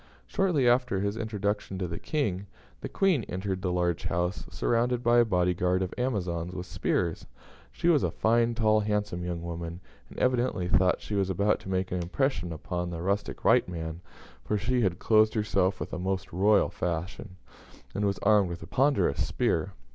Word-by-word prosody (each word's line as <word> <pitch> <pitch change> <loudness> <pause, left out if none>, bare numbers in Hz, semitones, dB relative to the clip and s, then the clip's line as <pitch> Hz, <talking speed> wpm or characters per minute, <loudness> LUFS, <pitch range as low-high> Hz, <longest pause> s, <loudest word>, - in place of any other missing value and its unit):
Shortly 170 -10 +1
after 120 -5 +2
his 100 +1 -1
introduction 105 -3 -2
to 95 -1 -2
the 85 0 -5
King, 100 - -2 0.3
the - - -6
Queen 185 - +2
entered 95 0 -3
the 90 - -1
large 90 -1 0
house, 90 +3 -1
surrounded 120 +1 0
by 120 +1 +5
a 120 - +5
body 90 -4 +2
guard 90 +1 +1
of 90 - -4
Amazons 90 -8 -2
with 90 -1 -5
spears. 85 -2 -1 0.4
She 170 - -2
was 160 -5 +5
a - - +1
fine, 115 +1 +2
tall, 110 -2 +3
handsome 105 -4 -1
young 85 -1 -4
woman, 85 0 -5 0.3
and - - -13
evidently 125 -8 +1
thought 90 0 +2
she - - -6
was 100 -2 +1
about 100 +3 +1
to - - -10
make 95 0 -1
an 90 0 -1
impression 90 -1 -1
upon 85 +2 -4
the 85 -1 -5
rustic 100 +4 -2
white - - +4
man, 80 -1 -5 0.4
for 105 - -1
she 125 +5 0
had 95 -5 +1
clothed 110 +2 +3
herself 100 -3 +1
after - - -7
a - - -5
most 95 0 -3
royal 100 +3 +3
fashion, 90 +3 -4 0.6
and 100 - -2
was 100 -1 +1
armed 105 -3 +4
with 85 -1 -6
a - - -9
ponderous 140 +6 +2
spear. - - 0
95 Hz, 185 wpm, -28 LUFS, 90-110 Hz, 0.6 s, by